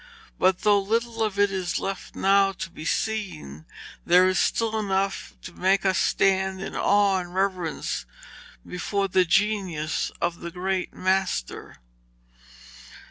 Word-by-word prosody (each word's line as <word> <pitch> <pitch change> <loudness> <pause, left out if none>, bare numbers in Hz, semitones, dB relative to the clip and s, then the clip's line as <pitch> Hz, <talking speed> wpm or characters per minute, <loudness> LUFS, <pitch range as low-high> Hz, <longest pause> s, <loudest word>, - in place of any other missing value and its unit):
But 185 0 +3
though 205 -1 +4
little 230 +3 -1
of 215 -3 -1
it 205 -1 +3
is 185 -3 -2
left 195 0 -5
now 195 0 +3
to 170 - -7
be 155 - -9
seen, 165 - -3 0.4
there 180 +2 +5
is 185 0 +1
still 220 -1 +1
enough 195 -1 -2
to 175 - -9
make 190 +3 +1
us 185 -2 +2
stand 190 0 +1
in 195 - -6
awe 200 -1 +3
and 175 0 -8
reverence 185 - -2 0.6
before 195 +2 -2
the 185 -1 +3
genius 185 -5 0
of 170 0 -1
the 170 - -6
great 185 +1 -2
master. 185 - -2
190 Hz, 135 wpm, -25 LUFS, 180-200 Hz, 0.6 s, there